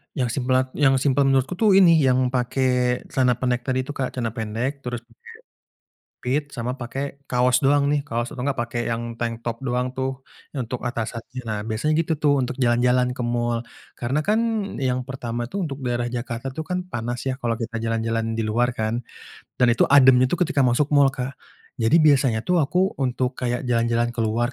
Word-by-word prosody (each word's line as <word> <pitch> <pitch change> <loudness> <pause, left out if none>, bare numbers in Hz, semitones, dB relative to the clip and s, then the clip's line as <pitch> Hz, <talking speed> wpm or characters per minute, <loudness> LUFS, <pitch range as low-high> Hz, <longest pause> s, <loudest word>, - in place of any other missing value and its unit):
Yang 125 0 -1
simlat 130 +1 +1
yang 135 -3 +4
simpel 135 +1 +2
menurutku 135 +6 +1
tuh 210 -4 +5
ini, 170 -4 +7
yang 130 -2 +2
pakai 125 0 +1
celana 125 -2 +2
pendek-pendek 125 +1 -1
itu 145 - -6
Kak. 130 -3 -4
Celana 115 -3 -2
pendek, 115 +5 -3
terus 120 -2 -5
pake 115 -1 -29 1.0
pit, 135 +4 0
sama 125 0 -3
pakai 135 +3 -5
kaos 125 +1 +3
doang 140 0 +4
nih, 145 - +1
kaos 120 -1 -2
atau 125 - -6
enggak 140 0 -1
pakai 120 0 -2
yang 115 0 -3
tanktop 115 0 -3
doang 125 +1 -1
tuh, 130 0 -3 0.3
untuk 125 -2 -4
atasannya. 120 +2 -4
Nah 105 -1 -2
biasanya 115 +8 0
gitu 165 0 +1
tuh, 145 -1 +3
untuk 125 +1 -3
jalan-jalan 125 +1 +3
ke - - -3
mall. 120 -1 0 0.4
Karena 130 +5 -1
kan, 215 +2 +2 0.4
yang 130 -1 0
pertama 120 -3 -4
tuh 195 -3 -2
untuk 135 - -5
daerah 120 0 -1
Jakarta 120 +1 -4
tuh 155 +2 -5
kan 180 0 -2
panas 120 -1 -4
ya, - - 0
kalau 115 -1 0
kita 115 -1 -4
jalan-jalan 115 0 -1
di - - 0
luar 120 +3 +1
kan, 110 +2 -1 0.6
dan 125 - +6
itu 115 - +3
ademnya 130 -2 +7
ketika 165 -2 0
masuk 125 +4 +2
mall 140 -1 +6
Kak. 130 +1 -5 0.4
Jadi 115 +8 +4
biasanya 130 -6 +3
tuh 180 -2 +2
aku 180 +6 +1
untuk 130 0 0
kayak 125 0 -3
jalan-jalan 120 0 +1
keluar 120 +2 0
125 Hz, 180 wpm, -23 LUFS, 120-135 Hz, 1.0 s, ini